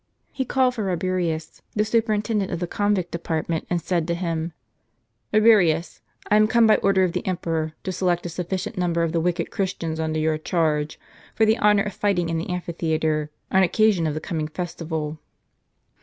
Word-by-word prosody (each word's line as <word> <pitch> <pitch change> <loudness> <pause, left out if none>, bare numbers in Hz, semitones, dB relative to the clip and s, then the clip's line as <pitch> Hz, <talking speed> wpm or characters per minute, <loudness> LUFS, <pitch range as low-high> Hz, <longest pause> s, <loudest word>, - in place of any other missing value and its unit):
He 265 - -2
called 255 0 +2
for 220 -4 -3
Eabirius, 175 -3 -2
the 210 0 +2
superintendent 215 -2 0
of 175 - -2
the 175 - -1
convict 205 -1 0
department, 165 -1 -2
and 175 - +1
said 170 -1 -1
to 170 - 0
him: 165 -1 -2 0.8
"Rabirius, 195 -7 +4 0.3
I 210 - +6
am 215 0 +5
come 235 +1 +4
by 220 - +6
order 195 -1 +3
of 180 -2 0
the - - -2
emperor, 165 -4 -2
to 190 - -2
select 180 -2 0
a - - -2
sufficient 180 +2 -4
number 170 -2 +1
of 165 - 0
the 165 0 0
wicked 175 0 -1
Christians 165 -4 -2
under 155 0 -1
your 155 0 +1
charge, 155 -2 0 0.4
for 220 - +4
the 220 +2 +3
honor 210 -1 +4
of 210 - -4
fighting 180 -5 0
in 165 -1 -1
the 165 - -5
amphitheatre, 160 -3 -1 0.2
on 190 - +5
occasion 190 -2 +3
of 150 - -2
the - - -2
coming 155 -1 -3
festival." 160 -2 -4
175 Hz, 185 wpm, -23 LUFS, 160-200 Hz, 0.8 s, I